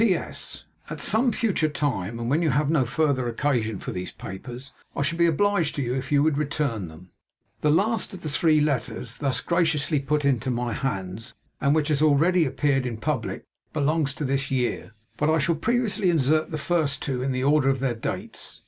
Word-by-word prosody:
'P.S. 185 -7 -2 0.3
At - - -6
some 235 +3 +2
future 195 -10 +1
time, 120 -9 -2
and 115 - -3
when 145 +7 +2
you 165 - +2
have 145 +2 +1
no 150 -6 +3
further 135 -1 +1
occasion 115 -4 0
for - - -6
these 90 0 -5
papers, 125 +7 -8 0.2
I - - 0
shall 165 +4 -2
be 170 - +5
obliged 170 0 +1
to 140 - -1
you 120 0 -1
if 130 +2 -4
you 145 -1 +4
would 150 -2 +2
return 140 - -1
them.' 80 +3 -14 0.5
The 150 - +1
last 210 +9 +2
of 185 -1 -10
the - - -3
three 155 +1 +3
letters 125 -4 -2
thus 130 -4 0
graciously 160 -3 +1
put 145 +2 -1
into 130 -3 +1
my 120 -1 -1
hands, 100 -4 -4 0.3
and 140 +1 +3
which 155 -1 +1
has 150 -1 +1
already 160 +4 +4
appeared 135 -1 +1
in 115 -2 -4
publick, 130 0 -2 0.3
belongs 150 -1 +1
to 150 - -3
this 135 0 -1
year; 125 -3 -1 0.2
but 150 - +1
I 160 - +4
shall 160 +2 +2
previously 220 +1 +1
insert 155 -1 +2
the 155 - -3
first 155 -2 0
two 130 -3 -2
in 135 +1 -1
the 130 0 -1
order 140 -1 +4
of 135 - +2
their 130 -2 0
dates. 115 - -6
145 Hz, 200 wpm, -25 LUFS, 125-155 Hz, 0.5 s, be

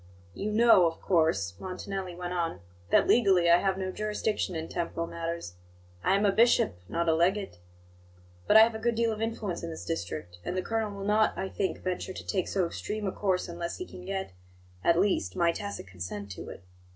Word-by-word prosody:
"You 210 - -3
know, 220 -5 +6
of 165 - -4
course," 160 - +1
Montanelli 185 0 -5
went 180 0 -4
on, 165 - -2 0.3
"that - - +4
legally 190 -7 +5
I 170 - +8
have 190 0 0
no 190 -1 -2
jurisdiction 210 -2 -2
in 160 0 -3
temporal 165 -1 -3
matters; 170 - -5 0.5
I 190 - +3
am 200 +1 +2
a 200 - +5
bishop, 195 - +3
not 170 0 -1
a 160 - +5
legate. 180 - +1 0.9
But 215 - +7
I - - +11
have 225 +1 +5
a 220 - -5
good 235 +1 0
deal 230 0 +2
of 215 0 -4
influence 220 -5 -2
in 170 - -5
this 160 - -7
district; 90 - -4
and 180 - -3
the 185 - 0
colonel 225 -1 -1
will 200 -1 -6
not, 215 +1 +2
I 190 - -2
think, 190 - -2
venture 185 0 -3
to - - -8
take 190 -4 -1
so 190 -3 +1
extreme 210 +5 -4
a 190 - 0
course 190 -2 0
unless 170 0 -5
he 365 - -5
can 180 - -11
get, 190 - -4 0.5
at 170 - +4
least, 180 - +1
my 170 -1 +3
tacit 200 - -6
consent 95 +2 -7
to 95 - -7
it. - - -10
185 Hz, 210 wpm, -29 LUFS, 165-210 Hz, 0.9 s, I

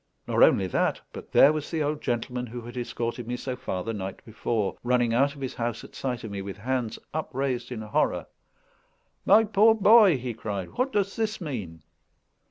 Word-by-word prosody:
Nor - - +1
only 95 - +6
that, 90 - 0
but - - -10
there 145 - +7
was 155 -1 -4
the 160 -2 -1
old 150 +1 -2
gentleman 125 +1 -2
who 120 +1 -7
had 120 +2 -10
escorted 120 -1 -4
me 125 +1 -2
so 130 0 -4
far 95 -7 -4
the 115 - -3
night 95 -2 -6
before, 110 -2 -2
running 120 -1 +2
out 140 +4 +2
of 140 - -12
his 130 - -3
house 120 -2 -3
at - - -13
sight 125 -3 -3
of 110 - -6
me, 100 -1 -4
with 95 0 -7
hands 120 0 -2 0.2
upraised 130 -5 -2
in 115 -3 -4
horror. 105 - 0 1.0
"My 210 +3 +7
poor 220 +1 +4
boy!" 210 - +6
he 125 -1 -4
cried, 100 -4 -5
"what 255 +2 -1
does 200 -3 0
this 220 -1 -1
mean?" 105 - -6
125 Hz, 195 wpm, -26 LUFS, 115-150 Hz, 1.0 s, there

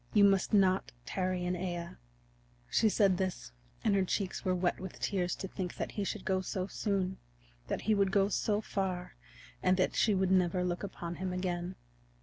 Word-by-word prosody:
You 205 - +7
must 195 -1 +4
not 190 -3 +3
tarry 185 -1 -1
in 180 - 0
Aea." 175 -1 -4 0.7
She 220 - +4
said 200 -3 +3
this 185 - -3 0.3
and 215 - +3
her 195 -1 +3
cheeks 190 +1 -2
were 185 -1 +1
wet 175 -1 0
with 190 -1 -7
tears 180 -3 0
to 190 - -5
think 180 -1 -4
that - - -3
he 205 - -2
should 200 0 -4
go 190 0 +1
so 185 0 -2
soon, 195 -2 -1 0.5
that - - -2
he 215 - +2
would 200 -2 +3
go 195 0 +4
so 210 0 +1
far, 190 -4 -3 0.5
and 185 - +3
that 185 - +1
she 215 -2 +3
would 190 0 +2
never 180 -1 +3
look 175 -1 -1
upon 175 -3 -5
him 185 0 -2
again. 180 0 -2
185 Hz, 190 wpm, -32 LUFS, 180-195 Hz, 0.7 s, You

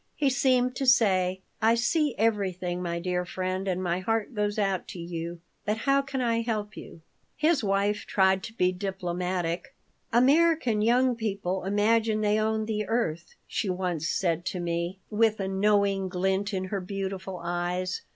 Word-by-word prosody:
He 280 -3 +2
seemed 255 -1 +2
to 270 - -1
say, 190 -7 +3 0.2
"I 225 +1 +5
see 290 +4 +1
everything, 185 -5 0
my 170 -1 -2
dear 180 0 -1
friend, 185 +2 -3
and 185 0 -1
my 175 0 0
heart 225 +5 -1
goes 210 -1 -1
out 195 -3 0
to 180 - -8
you, 170 0 -5 0.2
but 210 +1 -1
how 275 +4 +2
can 275 -1 -4
I 230 -1 +1
help 215 -3 -3
you?" 165 - -11 0.4
His 310 -3 +2
wife 200 +1 0
tried 190 -1 +3
to 225 - -9
be 180 -5 +2
diplomatic 180 +1 -3 0.4
"American 270 -2 +4
young 245 +3 +3
people 195 -4 -2
imagine 215 +2 +2
they 210 0 +2
own 220 0 0
the 215 -1 -2
earth," 170 -8 -2
she 205 - -2
once 180 -3 -1
said 170 -2 0
to 185 - -3
me, 170 +2 -2
with 220 0 +2
a 195 - -1
knowing 195 -1 +2
glint 190 +2 0
in 190 -2 -2
her 195 - -1
beautiful 190 0 -4
eyes. 175 +1 -2
195 Hz, 165 wpm, -27 LUFS, 180-225 Hz, 0.4 s, I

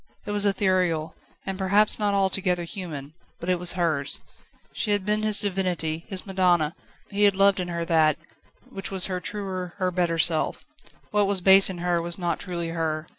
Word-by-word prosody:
It - - -4
was 205 0 +4
ethereal, 185 -5 +1 0.3
and 195 0 -4
perhaps 200 +4 +3
not 205 -1 +1
altogether 190 -2 +1
human, 160 -5 -7 0.3
but 170 - -5
it 180 -1 +1
was 175 0 +1
hers. 160 -6 -1 0.5
She - - -2
had 205 -2 -1
been 210 +1 0
his 215 -1 +3
divinity, 180 -5 -2
his 190 -3 -5
madonna; 180 -5 +2 0.4
he 205 +1 +3
had 200 -1 +4
loved 195 0 +4
in 180 - -2
her 170 -1 -3
that, 160 -3 +3 0.5
which 195 - -6
was 190 -1 +2
her 185 -1 -2
truer, 185 -1 -5
her 185 -2 0
better 175 -2 0
self. 160 0 0 0.5
What 210 -1 +2
was 200 -1 +1
base 195 +2 +6
in 185 - -5
her 175 -1 0
was 170 0 -3
not 175 -2 -2
truly 170 -3 -4
her. 160 -1 -3
180 Hz, 185 wpm, -25 LUFS, 170-195 Hz, 0.5 s, base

